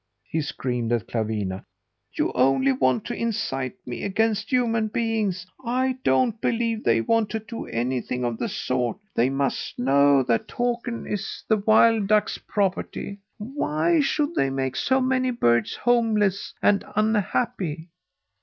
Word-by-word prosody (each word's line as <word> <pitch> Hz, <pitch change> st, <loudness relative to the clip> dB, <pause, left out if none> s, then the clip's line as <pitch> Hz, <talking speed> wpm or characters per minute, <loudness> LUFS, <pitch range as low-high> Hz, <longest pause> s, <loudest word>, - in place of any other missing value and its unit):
he 160 Hz, -, -1 dB
screamed 125 Hz, -5 st, -3 dB
at 115 Hz, -5 st, 0 dB
Clawina. 105 Hz, -4 st, -2 dB, 0.5 s
"You -, -, 0 dB
only 135 Hz, +1 st, +3 dB
want 130 Hz, -3 st, +1 dB
to -, -, -4 dB
incite 135 Hz, -, -2 dB
me 120 Hz, -1 st, -5 dB
against 215 Hz, +2 st, 0 dB
human 230 Hz, -3 st, +2 dB
beings. 215 Hz, -5 st, -1 dB, 0.2 s
I 255 Hz, +2 st, 0 dB
don't 230 Hz, -4 st, +2 dB
believe 230 Hz, -1 st, 0 dB
they 115 Hz, -1 st, +3 dB
want 225 Hz, -, +1 dB
to 220 Hz, -, -2 dB
do 225 Hz, +2 st, -7 dB
anything 125 Hz, +1 st, -2 dB
of 120 Hz, -2 st, -2 dB
the -, -, -1 dB
sort. 125 Hz, -2 st, -1 dB, 0.2 s
They 120 Hz, +3 st, +3 dB
must 135 Hz, 0 st, -2 dB
know 140 Hz, +2 st, +4 dB
that 115 Hz, -2 st, 0 dB
Takern 240 Hz, 0 st, -2 dB
is 205 Hz, -1 st, -4 dB
the 220 Hz, -, +3 dB
wild 220 Hz, 0 st, +4 dB
ducks' 215 Hz, 0 st, +2 dB
property. 200 Hz, 0 st, -2 dB, 0.2 s
Why 250 Hz, -, 0 dB
should 290 Hz, +2 st, +1 dB
they 135 Hz, -, +1 dB
make 135 Hz, -1 st, -2 dB
so 260 Hz, -, +2 dB
many 255 Hz, 0 st, +1 dB
birds 120 Hz, -, +1 dB
homeless 220 Hz, -5 st, +1 dB
and 205 Hz, -1 st, +4 dB
unhappy? 205 Hz, -5 st, 0 dB
200 Hz, 145 wpm, -24 LUFS, -, 0.5 s, know